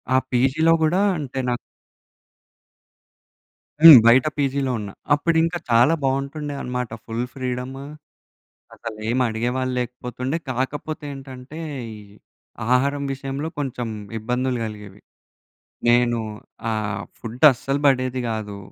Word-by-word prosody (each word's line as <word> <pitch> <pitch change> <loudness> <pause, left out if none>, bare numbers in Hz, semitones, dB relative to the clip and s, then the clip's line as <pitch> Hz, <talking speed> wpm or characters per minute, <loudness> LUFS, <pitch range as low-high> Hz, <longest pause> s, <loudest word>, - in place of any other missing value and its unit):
ఆ - - +6
పీజీలో 135 +6 +3
గూడా 175 +5 +2 0.2
అంటే 135 -2 -5
నాకు 120 - 0 2.3
హ్మ్. 165 -5 +13
బయట 125 +4 +6
పీజీలో 140 -2 0
ఉన్న 105 -2 -6 0.2
అప్పుడు 165 +3 +2
ఇంకా 165 +1 0
చాలా 120 +6 +5
బావుంటుండే 140 +2 -2
అన్నమాట. 125 -1 -3 0.2
Full 115 +2 -3
freedom! 125 0 -4 1.0
అసలేమి 115 +2 -3
అడిగేవాళ్ళు 125 +3 -1
లేకపోతుండే. 125 +3 -3
కాకపోతే 145 +5 -3
ఏంటంటే, 135 +2 -10 0.3
ఈ - - -10 0.8
ఆహారం 140 +3 +1
విషయంలో 135 +3 -4
కొంచెం 125 -4 -3 0.3
ఇబ్బందులు 125 +3 -1
గలిగేవి. 105 -2 -9 0.9
నేను 120 0 +4 0.5
ఆహ్, 105 -2 -2 0.2
ఫుడ్ 120 +4 -3
అస్సలు 135 +3 -2
బడేది 130 -2 +2
గాదు, 105 -2 -4
130 Hz, 105 wpm, -22 LUFS, 120-140 Hz, 2.3 s, హ్మ్